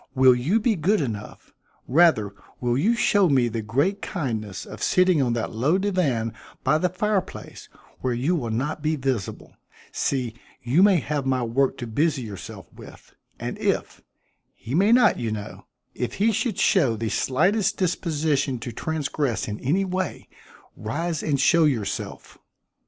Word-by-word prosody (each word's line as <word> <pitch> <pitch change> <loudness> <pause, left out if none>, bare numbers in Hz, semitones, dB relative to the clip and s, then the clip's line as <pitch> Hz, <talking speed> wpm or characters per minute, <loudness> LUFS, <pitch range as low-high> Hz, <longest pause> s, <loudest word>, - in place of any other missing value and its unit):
Will 130 -1 +6
you 145 - +1
be 225 0 +1
good 195 +6 +2
enough 110 -7 -6 0.3
rather 130 - +4 0.3
will 120 -1 0
you 200 - +2
show 205 -5 +3
me 130 -4 +3
the 115 -1 -3
great 140 - 0
kindness 110 - -4
of - - -10
sitting 180 -4 +3
on 120 -3 +1
that 115 -1 -2
low 135 +11 +1
divan 160 - 0 0.3
by 155 - +3
the 180 - +1
fireplace 195 +1 -3 0.3
where 130 - -1
you 140 +9 +1
will 125 -8 -3
not 135 +8 -2
be 155 +1 0
visible 130 -8 -3 0.4
see, 125 -5 -1 0.3
you 130 +9 +3
may 200 -2 +6
have 145 -1 -3
my 130 -2 +1
work 130 +4 +1
to 120 - -5
busy 140 +4 0
yourself 105 -4 -8
with - - -14 0.3
and - - -5
if - - -1 0.5
he 120 - -8
may 195 +7 +4
not, 245 +1 +5
you 115 -2 -2
know 105 -1 -7 0.3
if 125 - -4
he 220 +3 +2
should 220 -1 -1
show 140 - +3
the 110 0 -3
slightest 180 - +1
disposition 155 -6 0
to 120 +1 -6
transgress 145 -1 -2
in 105 0 -5
any 175 +10 +1
way, 185 0 -3 0.5
rise 160 +8 -3
and 145 -3 0
show 165 +2 +4
yourself?" 120 -9 -3
140 Hz, 160 wpm, -24 LUFS, 120-180 Hz, 0.5 s, Will